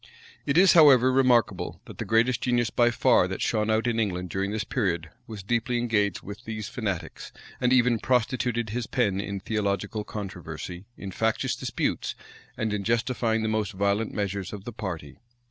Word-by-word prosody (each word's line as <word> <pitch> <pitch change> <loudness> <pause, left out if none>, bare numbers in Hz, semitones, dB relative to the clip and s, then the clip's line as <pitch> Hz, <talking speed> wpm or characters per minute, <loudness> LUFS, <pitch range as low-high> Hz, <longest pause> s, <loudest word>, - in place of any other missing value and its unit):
It 140 +2 +2
is, 190 0 +7
however, 135 -6 +7
remarkable, 130 -3 +2
that - - -12
the - - -3
greatest 115 +3 +2
genius 120 -2 +1
by 120 0 +3
far 120 - +3
that - - -5
shone 105 0 0
out 110 +1 +2
in 115 -1 0
England 90 -5 -2
during 95 +2 -1
this 105 0 -2
period, 85 - -2 0.2
was 105 -3 -8
deeply 120 +4 0
engaged 110 -5 0
with 100 +4 -9
these 110 -3 -5
fanatics, 100 -7 -4 0.3
and 125 - +2
even 125 -2 +4
prostituted 125 -2 0
his 120 0 -3
pen 100 -6 0
in 100 0 -4
theological 105 +1 -2
controversy, 90 -3 -7
in 100 - -7
factious 110 +3 0
disputes, - - -2 0.4
and 110 -1 -1
in 100 -1 -2
justifying 115 0 0
the - - 0
most 110 -2 -1
violent 100 +3 0
measures 100 -2 -3
of 100 -2 -8
the 120 - -7
party. 85 -9 -6
110 Hz, 175 wpm, -26 LUFS, 100-120 Hz, 0.4 s, is